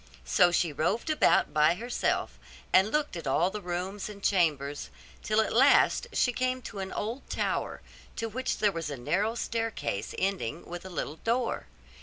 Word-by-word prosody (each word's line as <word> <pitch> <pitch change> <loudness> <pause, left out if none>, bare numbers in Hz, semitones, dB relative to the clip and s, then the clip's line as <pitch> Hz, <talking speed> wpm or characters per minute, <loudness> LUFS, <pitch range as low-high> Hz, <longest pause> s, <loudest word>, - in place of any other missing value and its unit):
So 65 - +5
she 170 -2 +1
roved 175 - 0
about 305 - +3
by 155 +2 +4
herself, 240 +5 -2 0.3
and 190 +3 +6
looked 300 -8 0
at 165 -4 -5
all 170 +7 +2
the 210 - -5
rooms 185 +3 -4
and 200 -1 -11
chambers, 145 -7 +1 0.3
till 215 +1 +2
at 220 - -2
last 275 - +5
she 250 - +2
came 255 +1 0
to 205 - -7
an 190 0 -4
old 230 +6 -4
tower, - - -2 0.3
to 225 - -2
which 255 +4 -2
there 210 -1 +3
was 165 -4 -4
a 145 - -5
narrow 200 - 0
staircase 225 - -3
ending 180 -6 -2
with 175 0 -7
a - - -7
little 160 -3 -4
door. 235 +4 -1
195 Hz, 175 wpm, -29 LUFS, 165-230 Hz, 0.3 s, and